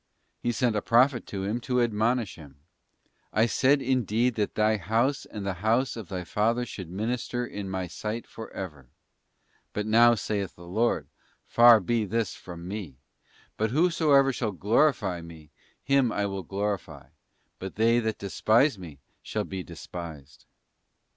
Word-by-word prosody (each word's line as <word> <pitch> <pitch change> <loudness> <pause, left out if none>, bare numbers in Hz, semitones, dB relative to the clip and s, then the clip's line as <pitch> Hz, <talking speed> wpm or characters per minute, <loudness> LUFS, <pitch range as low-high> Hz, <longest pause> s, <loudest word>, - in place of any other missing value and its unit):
't - - -6
He - - +3
sent 120 -2 +1
a 105 - +1
prophet 120 +3 +3
to 95 -1 -4
him 105 +5 -1
to 125 +1 0
admonish 115 -2 +1
him. 75 -5 -13 0.8
'I 110 +2 +4
said 135 +4 +3
indeed 125 -1 +1
that 105 -2 -2
thy 110 0 +3
house 115 - 0
and 105 -3 -7
the 100 - -1
house 115 +5 +2
of 110 -5 -7
thy 90 -2 -4
father 115 +7 0
should 95 -6 -8
minister 120 +5 -2
in 100 -4 -6
My 95 -1 -2
sight 105 +7 -5
for 110 - -9
ever. 75 -9 -7 0.9
But 105 - -2
now 120 +2 +6
saith 100 -2 -3
the 85 - -13
Lord, 110 +7 0 0.4
Far 120 -1 +7
be 110 +3 0
this 110 0 -1
from 85 -1 -9
Me: 95 -9 -6 0.6
but 110 +1 +1
whosoever 145 -2 +3
shall 110 -4 -2
glorify 105 - +2
Me, 80 -2 -13 0.3
him 140 -3 +3
will 100 -2 -2
I - - -24
glorify: 100 0 -4 0.5
but 95 0 -6
they 115 +2 +4
that 110 -2 -2
despise 110 +5 +2
Me 80 -6 -10 0.2
shall - - -3
be 95 -1 -5
despised. 85 -4 -9
110 Hz, 160 wpm, -27 LUFS, 95-120 Hz, 0.9 s, Far